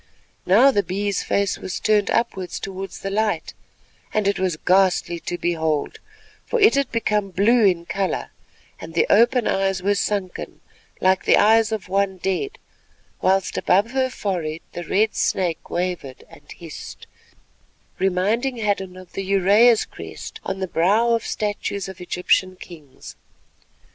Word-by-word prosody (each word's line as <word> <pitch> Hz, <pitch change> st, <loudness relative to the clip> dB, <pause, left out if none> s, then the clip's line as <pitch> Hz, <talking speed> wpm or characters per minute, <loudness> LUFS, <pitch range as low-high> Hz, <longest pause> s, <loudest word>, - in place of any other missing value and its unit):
Now 235 Hz, +9 st, +6 dB
the 205 Hz, -, +2 dB
Bee's 200 Hz, +2 st, -2 dB
face 200 Hz, -1 st, 0 dB
was 185 Hz, -, -5 dB
turned 210 Hz, -2 st, +2 dB
upwards 190 Hz, -6 st, -1 dB
towards 195 Hz, -1 st, -7 dB
the 195 Hz, -, -4 dB
light, 210 Hz, -5 st, -1 dB, 0.6 s
and 215 Hz, -2 st, 0 dB
it 200 Hz, -, +1 dB
was 185 Hz, -4 st, 0 dB
ghastly 180 Hz, -1 st, +2 dB
to 175 Hz, +2 st, -5 dB
behold, 160 Hz, -3 st, -1 dB, 0.4 s
for 480 Hz, -, -1 dB
it 425 Hz, +1 st, +6 dB
had 280 Hz, -2 st, 0 dB
become 210 Hz, -3 st, 0 dB
blue 210 Hz, +5 st, +3 dB
in 175 Hz, -3 st, +2 dB
colour, 190 Hz, -1 st, -2 dB, 0.5 s
and 165 Hz, 0 st, -10 dB
the -, -, +3 dB
open 240 Hz, +2 st, +4 dB
eyes 195 Hz, -1 st, 0 dB
were 200 Hz, +1 st, +3 dB
sunken 200 Hz, -2 st, -3 dB, 0.4 s
like 190 Hz, 0 st, +2 dB
the -, -, +5 dB
eyes 220 Hz, +1 st, +4 dB
of 215 Hz, -4 st, -4 dB
one 195 Hz, 0 st, 0 dB
dead, 195 Hz, -, -2 dB, 0.6 s
whilst 190 Hz, 0 st, +1 dB
above 205 Hz, +5 st, +2 dB
her 260 Hz, 0 st, +1 dB
forehead 170 Hz, -9 st, -3 dB
the 175 Hz, -, -6 dB
red 215 Hz, +6 st, +1 dB
snake 175 Hz, -4 st, -1 dB
wavered 175 Hz, -7 st, -4 dB
and -, -, -16 dB
hissed, -, -, -10 dB, 0.9 s
reminding 205 Hz, +8 st, 0 dB
Hadden 200 Hz, -4 st, -2 dB
of 185 Hz, -1 st, -13 dB
the -, -, -3 dB
Uraeus 200 Hz, +4 st, +4 dB
crest -, -, -9 dB
on 190 Hz, -, -3 dB
the 190 Hz, -, -2 dB
brow 200 Hz, +8 st, +2 dB
of 230 Hz, -, -1 dB
statues 205 Hz, -2 st, -3 dB
of 190 Hz, -2 st, -10 dB
Egyptian 180 Hz, +1 st, +1 dB
kings. 155 Hz, -7 st, -12 dB
195 Hz, 150 wpm, -22 LUFS, 180-215 Hz, 0.9 s, Now